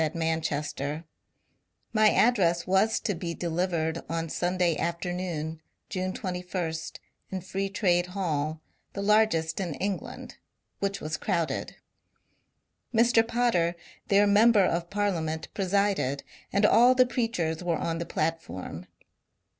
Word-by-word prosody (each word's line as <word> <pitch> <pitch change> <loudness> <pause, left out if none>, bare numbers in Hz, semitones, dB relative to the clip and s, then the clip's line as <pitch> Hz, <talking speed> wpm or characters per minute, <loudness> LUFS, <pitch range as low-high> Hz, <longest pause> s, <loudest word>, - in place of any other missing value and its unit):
THE 160 - +2
MASON 165 -1 +1 0.2
INCIDENT 150 0 -4 1.2
421 215 0 +5
address 175 -8 +2
was 195 +4 +3
to 205 - -1
be 170 -1 -4
delivered 165 -1 -1
on 165 0 -2
Sunday 175 0 +1
afternoon, 170 -2 -3 0.3
June 185 0 -2
21,* 180 -4 -4 0.3
in 190 - -3
Free 195 +2 -3
Trade 180 -3 +2
Hall, 160 -5 -2 0.3
the 200 - -4
largest 200 -7 +3
in 175 -6 -2
England, 195 -1 -4 0.4
which 200 0 -2
was 155 +1 -3
crowded. 165 -2 -2 1.2
Mr. 230 0 +4
Potter, 230 -8 +1 0.3
their 200 +1 +5
member 205 0 +5
of 170 0 -1
Parliament, 170 -6 -1
presided, 195 -8 0 0.3
and 200 +1 +3
all 245 +4 +6
the 255 0 +6
preachers 180 -10 -1
were 170 -2 0
on 165 +1 -2
the 170 - -3
platform. 155 - -3
180 Hz, 120 wpm, -28 LUFS, 165-200 Hz, 1.2 s, all